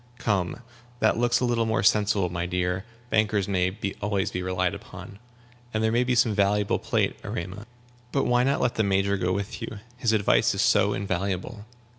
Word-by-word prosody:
"Come, 100 -2 -1 0.4
that 115 - +2
looks 120 0 +2
a - - +2
little 115 -2 +1
more 110 - 0
sensible, 105 -3 +3
my 85 0 -3
dear; 90 +2 -1 0.3
bankers 105 -3 +2
may 95 -1 0 0.2
always 100 -2 -1
be 90 - -3
relied 90 0 0
upon. 100 -1 -10 0.6
And 110 - +1
there 110 - +2
may 120 +2 +3
be 125 0 +1
some 115 -2 +3
valuable 100 0 +2
plate, - - 0
Erema. 95 +5 -6 0.4
But 135 - +1
why 125 0 +3
not 135 +2 +1
let 125 -1 +1
the 110 - +1
Major 100 0 +1
go 90 -2 -1
with 100 +5 -3
you? 115 -2 -5 0.2
His 120 -3 +1
advice 105 -3 +3
is - - +1
so - - +3
invaluable." 100 +3 -3
100 Hz, 185 wpm, -26 LUFS, 95-115 Hz, 0.6 s, sensible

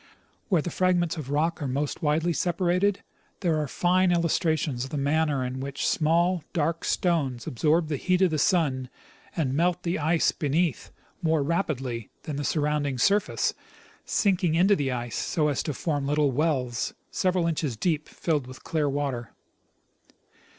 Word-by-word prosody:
Where 175 -7 +3
the 175 - -4
fragments 175 -2 +1
of 150 -5 -6
rock 160 +3 0
are 145 - -1
most 140 +3 -2
widely 160 +3 +1
separated, 180 +3 +1 0.4
there 165 -4 +1
are 150 - -2
fine 180 +5 +2
illustrations 160 -6 +1
of 135 - -6
the 150 - -4
manner 145 -1 +1
in 125 +1 -4
which 140 +1 -3
small, 170 +2 +2
dark 165 -1 0
stones 145 -9 0
absorb 155 +6 +1
the 150 -2 -2
heat 185 +5 +2
of 180 - +3
the 155 - 0
sun 140 -8 +1 0.5
and 140 -6 0
melt 175 +4 +1
the 170 -1 -1
ice 160 +2 +2
beneath 155 +1 -1 0.3
more 160 -3 +2
rapidly 135 - -2
than 150 - -4
the 145 - -2
surrounding 145 -2 0
surface, 200 +10 +2 0.5
sinking 185 -6 +1
into 190 +4 +5
the 140 -5 -1
ice 120 -1 -3
so 150 -2 0
as 140 - 0
to 155 - -3
form 145 -3 -1
little 145 -1 +2
wells, 130 -5 -1 0.2
several 185 -2 +1
inches 155 -7 -1
deep, 155 +1 -1
filled 150 -6 -1
with 130 +1 -11
clear 155 -3 0
water. 135 -4 -3
155 Hz, 160 wpm, -26 LUFS, 140-175 Hz, 0.5 s, into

